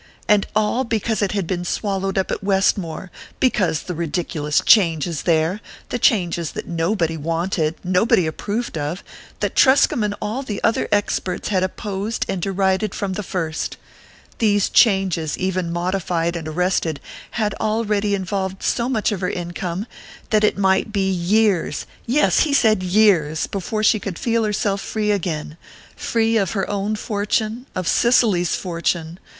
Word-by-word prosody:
And 210 Hz, -1 st, +3 dB
all 215 Hz, +4 st, +2 dB
because 225 Hz, -2 st, -1 dB
it 200 Hz, -1 st, 0 dB
had 200 Hz, -3 st, -1 dB
been 175 Hz, +1 st, -2 dB
swallowed 195 Hz, +1 st, -2 dB
up 190 Hz, -, 0 dB
at -, -, -3 dB
Westmore 190 Hz, -2 st, 0 dB, 0.3 s
because 185 Hz, -, +1 dB
the 180 Hz, -, -5 dB
ridiculous 160 Hz, -2 st, -1 dB
changes 165 Hz, -5 st, +4 dB
there, 165 Hz, +5 st, +2 dB, 0.3 s
the 245 Hz, -, -2 dB
changes 175 Hz, -8 st, +1 dB
that -, -, -5 dB
nobody 165 Hz, 0 st, 0 dB
wanted, 165 Hz, +1 st, -1 dB
nobody 185 Hz, 0 st, +3 dB
approved 205 Hz, +4 st, -3 dB
of 150 Hz, +6 st, -4 dB, 0.4 s
that -, -, -1 dB
Truscomb 260 Hz, -4 st, +4 dB
and 205 Hz, -1 st, -1 dB
all 215 Hz, +5 st, -3 dB
the 215 Hz, -7 st, -4 dB
other 225 Hz, -, +2 dB
experts 205 Hz, -3 st, -1 dB
had 190 Hz, -3 st, +1 dB
opposed 200 Hz, +3 st, -3 dB
and 185 Hz, -, -2 dB
derided 195 Hz, +2 st, 0 dB
from 195 Hz, -2 st, -2 dB
the 210 Hz, -, -3 dB
first 165 Hz, -5 st, -3 dB, 0.6 s
these 205 Hz, -3 st, +2 dB
changes, 190 Hz, -8 st, +3 dB
even 185 Hz, -2 st, -1 dB
modified 175 Hz, -1 st, -1 dB
and 165 Hz, -2 st, -5 dB
arrested, 165 Hz, -2 st, 0 dB, 0.4 s
had 210 Hz, -3 st, 0 dB
already 215 Hz, -2 st, +1 dB
involved 190 Hz, 0 st, -3 dB
so 240 Hz, +1 st, 0 dB
much 225 Hz, -3 st, +1 dB
of 200 Hz, -3 st, -3 dB
her 180 Hz, -, 0 dB
income, 175 Hz, +2 st, -4 dB, 0.5 s
that 215 Hz, -1 st, +3 dB
it 210 Hz, -, +3 dB
might 190 Hz, +1 st, +2 dB
be 195 Hz, -2 st, 0 dB
years 190 Hz, +1 st, +1 dB, 0.2 s
yes, 280 Hz, +6 st, +3 dB
he 290 Hz, -3 st, +3 dB
said 220 Hz, -7 st, +4 dB
years! 180 Hz, -5 st, +3 dB
before 215 Hz, +3 st, -3 dB
she 215 Hz, 0 st, +4 dB
would 185 Hz, -4 st, -4 dB
feel 230 Hz, -2 st, 0 dB
herself 205 Hz, -1 st, 0 dB
free 210 Hz, -1 st, -1 dB
again 165 Hz, -5 st, -3 dB, 0.4 s
free 225 Hz, 0 st, +1 dB
of 195 Hz, -4 st, 0 dB
her 195 Hz, -3 st, -1 dB
own 205 Hz, +1 st, -1 dB
fortune, 215 Hz, +3 st, -2 dB
of 185 Hz, -2 st, -2 dB
Cicely's 215 Hz, -8 st, +3 dB
fortune... 170 Hz, -1 st, -2 dB
195 Hz, 155 wpm, -21 LUFS, 175-215 Hz, 0.6 s, changes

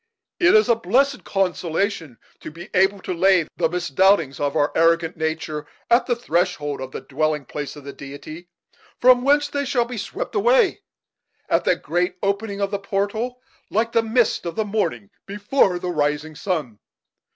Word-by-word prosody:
It 360 Hz, +3 st, +5 dB
is 430 Hz, -, +5 dB
a 235 Hz, -, +5 dB
blessed 250 Hz, +6 st, +1 dB
consolation 180 Hz, -, -1 dB, 0.2 s
to -, -, -8 dB
be 170 Hz, +3 st, -12 dB
able 190 Hz, +1 st, +2 dB
to -, -, -3 dB
lay 180 Hz, -2 st, +3 dB
the 165 Hz, -2 st, +1 dB
misdoubtings 180 Hz, -2 st, +2 dB
of 145 Hz, -1 st, -1 dB
our 145 Hz, -1 st, +2 dB
arrogant 165 Hz, 0 st, +2 dB
nature 155 Hz, -2 st, -3 dB, 0.2 s
at 235 Hz, +2 st, +4 dB
the 240 Hz, -, +1 dB
threshold 170 Hz, -, -1 dB
of 130 Hz, 0 st, -6 dB
the -, -, -6 dB
dwelling 150 Hz, 0 st, -1 dB
place 145 Hz, +3 st, -6 dB
of 145 Hz, -, -11 dB
the 140 Hz, 0 st, -8 dB
Deity, 155 Hz, +5 st, -10 dB, 0.5 s
from 250 Hz, 0 st, +6 dB
whence 290 Hz, +2 st, +3 dB
they 285 Hz, -1 st, -2 dB
shall 255 Hz, -3 st, +1 dB
be 240 Hz, -2 st, -6 dB
swept 475 Hz, -, -5 dB
away, 465 Hz, 0 st, +3 dB, 0.7 s
at -, -, +1 dB
the -, -, +3 dB
great 180 Hz, +2 st, -1 dB
opening 200 Hz, +1 st, -1 dB
of 200 Hz, -, -1 dB
the 200 Hz, -, -2 dB
portal, 210 Hz, +5 st, -2 dB, 0.3 s
like 230 Hz, +2 st, 0 dB
the 230 Hz, -, +3 dB
mists 225 Hz, +1 st, +1 dB
of 170 Hz, -, -5 dB
the 220 Hz, -1 st, -1 dB
morning 165 Hz, -, -2 dB, 0.2 s
before 205 Hz, -1 st, +1 dB
the 180 Hz, 0 st, -3 dB
rising 150 Hz, 0 st, -1 dB
sun. 150 Hz, -, -3 dB
185 Hz, 175 wpm, -22 LUFS, 155-230 Hz, 0.7 s, from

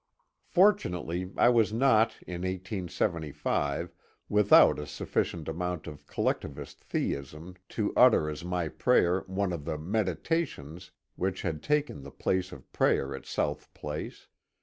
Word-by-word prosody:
Fortunately 95 Hz, -, +2 dB
I -, -, +6 dB
was 115 Hz, -4 st, +3 dB
not 115 Hz, -1 st, +3 dB
in 90 Hz, -1 st, -5 dB
1875 90 Hz, -6 st, -2 dB, 0.4 s
without 105 Hz, -6 st, +6 dB
a 75 Hz, -, -6 dB
sufficient 80 Hz, -3 st, -2 dB
amount 90 Hz, 0 st, -3 dB
of 75 Hz, -3 st, -10 dB
collectivist 70 Hz, 0 st, -3 dB
theism 75 Hz, +6 st, -4 dB, 0.2 s
to 105 Hz, -2 st, -2 dB
utter 125 Hz, -11 st, +6 dB
as 75 Hz, 0 st, -5 dB
my 90 Hz, -1 st, -1 dB
prayer 95 Hz, -2 st, +2 dB
one 95 Hz, -1 st, -1 dB
of 75 Hz, -4 st, -5 dB
the 75 Hz, -, -2 dB
meditations 90 Hz, -, -2 dB
" -, -, -53 dB
which 95 Hz, 0 st, -2 dB
had 80 Hz, -4 st, -2 dB
taken 150 Hz, -, 0 dB
the 70 Hz, -, -9 dB
place 95 Hz, +6 st, -1 dB
of 65 Hz, -, -13 dB
prayer 70 Hz, 0 st, +2 dB
at 65 Hz, -, -10 dB
South -, -, -2 dB
Place. 75 Hz, +1 st, -6 dB
90 Hz, 135 wpm, -29 LUFS, 75-105 Hz, 0.4 s, I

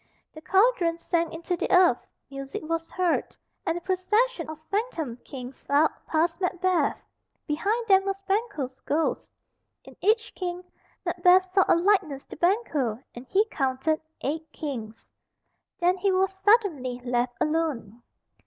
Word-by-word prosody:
The 310 Hz, -, -11 dB
cauldron 380 Hz, -3 st, +3 dB
sank 335 Hz, -1 st, -1 dB
into 335 Hz, +2 st, -3 dB
the -, -, -3 dB
earth; 360 Hz, -9 st, +4 dB, 0.2 s
music 275 Hz, +1 st, -6 dB
was 330 Hz, +1 st, -2 dB
heard, 365 Hz, -2 st, -1 dB, 0.3 s
and 330 Hz, -, +1 dB
a -, -, -6 dB
procession 420 Hz, +6 st, 0 dB
of 315 Hz, -, -6 dB
phantom 345 Hz, -, -2 dB
kings 255 Hz, 0 st, -9 dB
filed 290 Hz, +3 st, +3 dB, 0.2 s
past 335 Hz, +3 st, 0 dB
Macbeth; 365 Hz, -1 st, +1 dB, 0.5 s
behind 415 Hz, +10 st, -1 dB
them 385 Hz, -1 st, +5 dB
was 390 Hz, 0 st, -2 dB
Banquo's 390 Hz, -, -2 dB
ghost. 315 Hz, +2 st, -1 dB, 0.5 s
In -, -, -14 dB
each 445 Hz, +3 st, +2 dB
king, 360 Hz, -1 st, -4 dB, 0.4 s
Macbeth 365 Hz, 0 st, +5 dB
saw 385 Hz, -1 st, +5 dB
a -, -, +5 dB
likeness 345 Hz, -6 st, +1 dB
to -, -, -10 dB
Banquo, 310 Hz, -, +1 dB, 0.2 s
and 245 Hz, +2 st, -10 dB
he 405 Hz, +8 st, +3 dB
counted 270 Hz, +3 st, 0 dB, 0.2 s
eight 315 Hz, +3 st, -3 dB
kings. 230 Hz, -8 st, -7 dB, 0.7 s
Then 360 Hz, +1 st, +3 dB
he 390 Hz, +1 st, +1 dB
was 380 Hz, +1 st, +2 dB
suddenly 380 Hz, -, +2 dB
left 245 Hz, 0 st, 0 dB
alone. 300 Hz, -9 st, -1 dB
335 Hz, 140 wpm, -26 LUFS, 280-385 Hz, 0.7 s, them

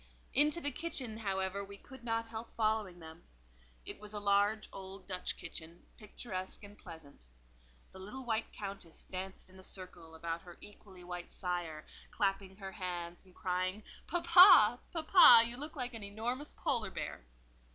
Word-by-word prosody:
Into 300 Hz, +5 st, +4 dB
the 290 Hz, -3 st, -2 dB
kitchen, 255 Hz, -7 st, -4 dB
however, 195 Hz, -2 st, -2 dB
we 200 Hz, 0 st, -10 dB
could 265 Hz, +3 st, -14 dB
not 230 Hz, -1 st, -1 dB
help 225 Hz, +1 st, -7 dB
following 215 Hz, -4 st, 0 dB
them: 160 Hz, -1 st, -12 dB, 0.6 s
it -, -, -6 dB
was 210 Hz, 0 st, -9 dB
a 210 Hz, -, -3 dB
large 205 Hz, +1 st, +2 dB
old 190 Hz, 0 st, -9 dB
Dutch 185 Hz, -2 st, -3 dB
kitchen, 165 Hz, +1 st, -9 dB
picturesque 205 Hz, -3 st, -6 dB
and 205 Hz, 0 st, -11 dB
pleasant. 160 Hz, -, -13 dB, 0.6 s
The 190 Hz, -, -12 dB
little 250 Hz, +8 st, -8 dB
white 225 Hz, -1 st, -1 dB
Countess 195 Hz, -5 st, -8 dB
danced 190 Hz, +1 st, -6 dB
in 190 Hz, -, -15 dB
a -, -, -11 dB
circle 180 Hz, -4 st, -10 dB
about 165 Hz, 0 st, -4 dB
her 175 Hz, -2 st, -13 dB
equally 195 Hz, -3 st, -12 dB
white 175 Hz, 0 st, -7 dB
sire, 175 Hz, -4 st, -3 dB, 0.2 s
clapping 195 Hz, -1 st, -1 dB
her 195 Hz, -1 st, -7 dB
hands 175 Hz, -3 st, -5 dB
and 185 Hz, -2 st, -21 dB
crying, 185 Hz, +2 st, -1 dB, 0.2 s
"Papa, 350 Hz, -, +8 dB
papa, 315 Hz, -8 st, +8 dB
you 235 Hz, +1 st, -5 dB
look 300 Hz, +5 st, -6 dB
like 250 Hz, -3 st, -3 dB
an 225 Hz, -, -7 dB
enormous 235 Hz, +8 st, -4 dB
Polar -, -, -1 dB
bear." -, -, -5 dB
200 Hz, 160 wpm, -34 LUFS, 185-230 Hz, 0.6 s, Papa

